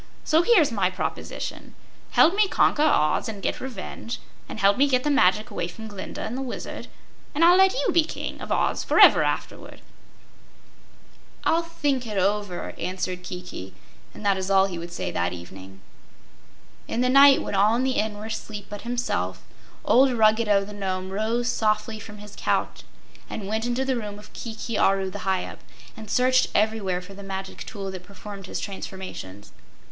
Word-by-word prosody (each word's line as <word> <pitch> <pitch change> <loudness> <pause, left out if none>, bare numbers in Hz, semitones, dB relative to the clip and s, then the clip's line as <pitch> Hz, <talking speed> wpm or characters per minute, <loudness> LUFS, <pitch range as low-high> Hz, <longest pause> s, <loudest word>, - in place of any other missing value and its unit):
So 315 +1 +4
here's 345 - +4
my 195 -5 +1
proposition: 185 - -5 0.3
Help 340 - +5
me 420 0 +4
conquer 305 - +2
Oz 190 - +2
and 210 -2 -6
get - - -2
revenge, 235 -1 -6 0.3
and - - -6
help 200 0 +5
me 280 +2 +4
get 255 -2 +2
the 295 - +1
magic 210 -4 +3
away 170 - -2
from 220 +5 -9
Glinda 200 -3 -7
and 230 - -4
the 265 - -3
Wizard, 260 -2 -6 0.5
and 325 +3 +5
I'll 350 +1 +7
let 380 +2 +5
you - - +1
be 335 - +5
King 310 - -6
of - - -7
Oz - - +1
forever - - +7
afterward." - - -3 1.6
"I'll 330 +1 +3
think 290 -7 -2
it 210 -2 -4
over," 200 -1 -1
answered 180 0 -3
Kiki, 180 - -8 0.4
and 215 - -11
that 200 -1 +3
is 190 0 -3
all 195 -1 +5
he 180 -3 -5
would 170 +1 -7
say 175 - -4
that 85 +1 -1
evening. 95 +2 -11 1.1
In 235 - -1
the 250 - +3
night 275 +1 +7
when - - -5
all 205 +3 +4
in 245 - 0
the 265 - +1
Inn 215 -1 -1
were 210 - -7
asleep 215 -2 -6
but 205 - -6
himself, 95 - -2 0.4
old 265 +3 +5
Ruggedo 215 -3 +3
the 210 - -9
Nome 190 -2 -3
rose 225 +4 -1
softly 215 -1 0
from 210 0 -10
his 210 0 -11
couch - - -1 0.5
and 205 - -5
went 220 +3 -1
into 245 +2 0
the 265 -1 +1
room 210 -3 -5
of 210 0 -14
Kiki 225 -1 -4
Aru 195 -1 +2
the 200 -1 -7
Hyup, 190 -1 -1 0.4
and 220 -1 -10
searched 255 +2 +3
everywhere 205 -4 +1
for 195 +2 -11
the 200 - -10
magic 195 -1 -6
tool 195 -3 -5
that 185 -1 -7
performed 200 0 -10
his - - -4
transformations. 190 - -7
210 Hz, 180 wpm, -25 LUFS, 190-245 Hz, 1.6 s, I'll